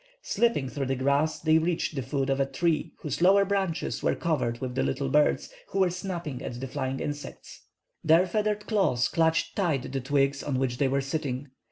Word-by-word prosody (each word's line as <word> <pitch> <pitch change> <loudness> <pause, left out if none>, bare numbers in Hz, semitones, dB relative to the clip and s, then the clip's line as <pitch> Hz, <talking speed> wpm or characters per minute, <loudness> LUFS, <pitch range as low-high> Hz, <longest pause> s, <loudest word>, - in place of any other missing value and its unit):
Slipping 230 - +1
through 135 0 -3
the 135 - 0
grass, 140 +4 +1
they 160 0 +4
reached 165 0 -1
the 135 - -2
foot 135 +1 -1
of 135 - 0
a 135 - +3
tree 165 0 0
whose 150 +1 -3
lower 195 +2 +6
branches 190 -5 -1
were - - +1
covered 135 -8 -1
with 130 -2 -4
the 130 - 0
little 135 0 -1
birds, 150 - +2
who - - -5
were 190 -2 +3
snapping 175 -7 -5
at 120 - -5
the 135 - -4
flying 130 +1 -3
insects. 145 0 -7 0.4
Their 165 +3 +5
feathered 210 +2 -1
claws 190 - +2
clutched 165 -1 +1
tight 155 -11 0
the 135 -1 -2
twigs 140 +1 +1
on 140 -3 -2
which 130 -1 -1
they 140 - +3
were 135 +1 +1
sitting. 135 -1 -3
145 Hz, 200 wpm, -27 LUFS, 135-170 Hz, 0.4 s, lower